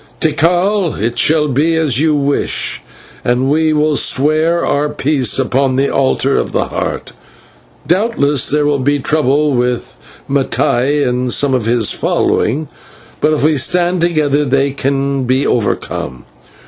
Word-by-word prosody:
Tikal, 175 +4 +1
it 115 +3 -2
shall 150 -1 +2
be 150 +5 +1
as 150 -6 +1
you 155 0 +2
wish, 140 0 -1 0.4
and 125 +3 0
we 155 +1 +2
will 150 0 +1
swear 155 +6 +1
our 145 +1 0
peace 135 -5 0
upon 135 0 0
the 135 +1 0
altar 135 0 +1
of - - -2
the - - -1
Heart. - - -4 0.7
Doubtless 170 - +1
there 150 0 +1
will 145 -1 +1
be 145 +2 +1
trouble 150 0 +1
with 125 -1 -2 0.3
Mattai 140 0 0
and 125 0 -1
some 140 +1 +2
of 120 -4 -1
his 115 -2 +2
following, 145 +7 -1 0.5
but 150 - +2
if 155 -2 0
we 155 0 +2
stand 175 +5 +1
together 150 -4 +1
they 140 0 +1
can 135 0 -2
be 130 +3 +1
overcome. 65 - -2
145 Hz, 145 wpm, -14 LUFS, 130-155 Hz, 0.7 s, shall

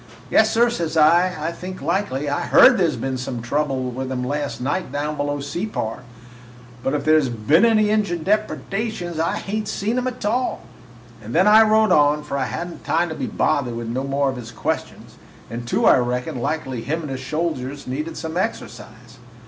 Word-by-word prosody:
"'Yes, 220 0 +4
sir,' 235 +1 +3
says 165 -8 -2
I, 170 +4 +5
'I 165 - -2
think 185 +2 -8
likely. 170 -6 -1
I 145 0 -1
heard 250 -5 +7
there 175 -3 +3
was 130 -1 -3
some 125 -1 -4
trouble 130 +1 -1
with 130 +1 -5
'em 125 -1 -2
last 145 +3 -3
night 145 +4 -2
down 150 +2 -2
below 145 0 -2
Separ, 145 - -4 0.8
but 135 +3 -1
if 140 - -3
there 155 0 +5
's 135 - -2
been 120 - +2
any 215 -2 +3
Injun 200 -6 0
depredations 200 -3 -2
I 165 - 0
hain't 210 +1 -3
seen 220 +4 -1
'em 255 - -2
a - - 0
tall.' 245 +1 -2 0.6
And 110 +3 -6
then 180 +3 +5
I 215 +1 +8
rode 220 -1 +4
on, 150 -2 +4
for 145 -2 -5
I 135 -2 0
had 170 +7 -4
n't - - -12
time 170 +2 +1
to 160 - -5
be 135 - -3
bothered 125 -4 0
with 115 -1 -5
no 130 +3 -2
more 140 0 0
of 130 - -8
his 115 -2 -8
questions, - - -4 0.3
and, 120 0 -6
too, - - +1
I - - +6
reckoned 125 0 -2
likely 130 -3 -2
him 160 +7 -3
and 145 - -5
his 130 0 -5
soldiers 145 -2 -3
needed 150 +6 -4
some 160 +1 -5
exercise. 120 - -5
150 Hz, 200 wpm, -21 LUFS, 130-185 Hz, 0.8 s, I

